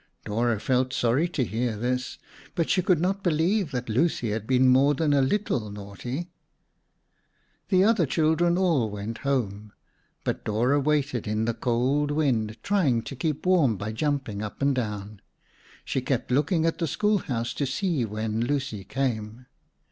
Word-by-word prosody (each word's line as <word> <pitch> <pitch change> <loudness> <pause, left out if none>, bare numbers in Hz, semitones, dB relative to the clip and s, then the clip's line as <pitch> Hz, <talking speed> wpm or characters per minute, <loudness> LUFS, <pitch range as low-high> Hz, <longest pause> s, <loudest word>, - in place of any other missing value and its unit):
Dora 115 +1 0
felt 130 +2 +1
sorry 130 +7 +2
to 145 -6 -1
hear 115 0 -2
this, 125 +3 -2 0.4
but 165 - 0
she 185 - +3
could 180 -2 +2
not 190 +3 0
believe 175 +2 +1
that 125 -3 -4
Lucy 120 -1 +1
had 110 0 -3
been 130 0 +4
more 135 +3 +5
than 150 0 +1
a 140 - +4
little 130 - 0
naughty. 105 - -6 1.4
The 185 -1 +4
other 200 -7 +3
children 165 +4 +2
all 165 - +2
went 105 +2 -5
home, 105 -7 -2 0.5
but - - -2
Dora 120 +7 +2
waited 140 -5 0
in 105 +1 0
the 115 - 0
cold 130 +5 0
wind, 120 -8 0
trying 150 - +2
to 135 - -7
keep 150 +4 -2
warm 160 - +3
by 100 +3 -4
jumping 135 -4 -2
up 105 -1 -6
and 140 0 +2
down. 105 -4 -4 0.6
She 130 - -1
kept 130 -1 -2
looking 155 +5 +2
at 165 - 0
the 165 - 0
schoolhouse 145 - 0
to 140 - -1
see 160 -1 0
when 110 +1 -2
Lucy 135 -5 -2
came. 115 0 -3
130 Hz, 160 wpm, -26 LUFS, 110-155 Hz, 1.4 s, more